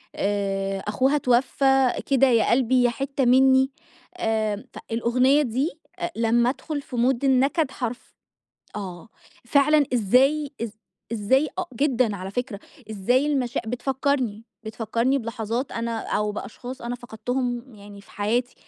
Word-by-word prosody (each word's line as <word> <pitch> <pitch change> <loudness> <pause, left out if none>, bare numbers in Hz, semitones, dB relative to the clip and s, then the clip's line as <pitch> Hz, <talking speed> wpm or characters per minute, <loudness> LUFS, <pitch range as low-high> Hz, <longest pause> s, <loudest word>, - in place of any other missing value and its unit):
آآ 195 -1 -1
أخوها 260 +8 +1
اتوفّى، 270 0 +3
كده 270 -1 +4
يا 230 -3 +3
قلبي 250 0 +3
يا 245 - +4
حتة 270 +3 -2
مني، 265 +2 +5 0.5
آآ 220 - -1 0.2
فالأغنية 250 +5 +3
دي 265 +4 -1 0.3
أ 345 -1 -2
لمّا 235 +1 +2
أدخل 290 +2 -4
في 260 - -9
mood 245 +2 +2
النكد 270 +2 +2
حرف 245 -1 -6 0.6
آه، 185 -1 -7 0.4
فعلًا 290 +4 +4
إزاي، 265 +7 +3
إز 230 - -3 0.4
إزاي 260 +7 +2
أ - - +1
جدًا 250 -6 +1
على 190 0 -6
فكرة، 240 -1 -4 0.3
إزاي 245 +7 +1
المشا 265 -5 0
بتفكّرني 250 -2 -1 0.2
بتفكّرني 230 +4 0
بلحظات 230 +2 -3
أنا 230 0 -2
أو 210 -1 -1
بأشخاص 245 +4 -7
أنا 240 +1 -3
فقدتهم 245 +1 -4
يعني 205 -1 -12
في 200 - -20
حياتي، 235 +5 -1
245 Hz, 130 wpm, -24 LUFS, 220-265 Hz, 0.6 s, مني